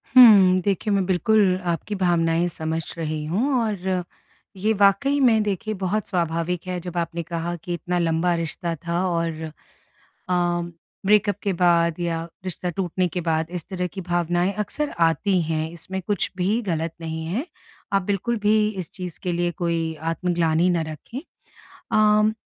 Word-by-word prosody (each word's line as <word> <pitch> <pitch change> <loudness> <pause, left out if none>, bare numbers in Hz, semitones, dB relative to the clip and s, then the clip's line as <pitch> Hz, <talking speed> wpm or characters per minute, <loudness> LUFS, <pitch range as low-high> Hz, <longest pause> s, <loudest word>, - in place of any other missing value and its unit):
हुँ, 200 -7 +9
देखिए, 200 +2 0
मैं 195 -2 +2
बिल्कुल 190 +1 +3 0.2
आपकी 205 +5 -4
भावनाएँ 170 -2 +2
समझ 160 +1 -2 0.2
रही 155 -2 -3
हूँ 225 - 0
और 190 -4 -1 0.5
ये 215 +4 +1
वाक़ई 205 +8 +3
में 230 -5 +5
देखिए, 210 +2 -2
बहुत 195 +2 -2
स्वाभाविक 170 0 -1
है, 180 -1 -2
जब 180 0 -6
आपने 170 0 -2
कहा 170 +1 -3
कि 175 +1 -6
इतना 175 +1 -2
लंबा 170 +1 +1
रिश्ता 170 +1 -3
था 175 +2 0
और 165 -2 -1 0.9
अ, 180 - +2 0.7
ब्रेकअप 205 -1 +4
के 200 - +1
बाद 170 -1 +3
या 165 -1 -2 0.2
रिश्ता 180 -1 -3
टूटने 180 +1 -1
के 175 +2 -4
बाद 160 -1 0
इस 165 - -8
तरह 180 -1 -2
की 190 +2 -7
भावनाएँ 175 +1 0
अक्सर 290 +8 -1
आती 170 +3 +3
हैं, 160 0 -1
इसमें 190 +3 -6
कुछ 205 -3 0
भी 205 +6 +1
ग़लत 165 -5 -2
नहीं 160 0 -4
है। 215 - -2 0.5
आप 195 - +4
बिल्कुल 205 +5 -1
भी 215 0 +4
इस 185 -5 -5
चीज़ 180 -4 -6
के 180 - 0
लिए 175 0 0
कोई 165 -1 -1 0.2
आत्मग्लानि 170 0 +1
ना 170 -2 +1
रखें। 155 - -6 0.5
अ, 215 0 +2
180 Hz, 160 wpm, -23 LUFS, 165-195 Hz, 0.9 s, हुँ